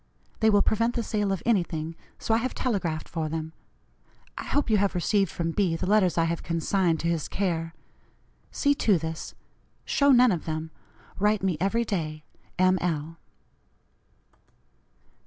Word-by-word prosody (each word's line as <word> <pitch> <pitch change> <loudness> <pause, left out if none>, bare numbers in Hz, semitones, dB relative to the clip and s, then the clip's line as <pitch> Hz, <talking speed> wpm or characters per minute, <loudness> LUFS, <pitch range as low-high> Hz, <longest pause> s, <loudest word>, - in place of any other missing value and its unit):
They 220 - +4
will 205 -1 +4
prevent 230 +2 +1
the 235 - 0
sale 210 -2 -1
of 195 - -2
anything, 165 -7 0 0.2
so 225 - -1
I - - +4
have 250 +2 -2
telegraphed 180 -10 -2
for 160 -2 -3
them. 160 0 -4 0.8
I - - -6
hope 290 - 0
you 220 -2 +3
have 200 -1 +1
received 195 +2 +1
from 165 +1 -2
B. 180 -2 +1
the - - -3
letters 190 -3 +3
I 165 - +4
have 165 0 -1
consigned 170 0 0
to 170 - -1
his 165 -3 -1
care. 165 -4 -2 0.7
See 285 -1 +2
to 215 -8 +2
this. 160 0 -6 0.5
Show 280 0 +2
none 250 -2 +6
of 175 -4 -2
them. 160 0 -4 0.5
Write 210 0 +2
me 190 -3 +1
every 230 +5 +1
day. 155 -7 -3 0.3
"M. 185 0 +3
L." 165 -1 -2
185 Hz, 160 wpm, -26 LUFS, 165-215 Hz, 0.8 s, none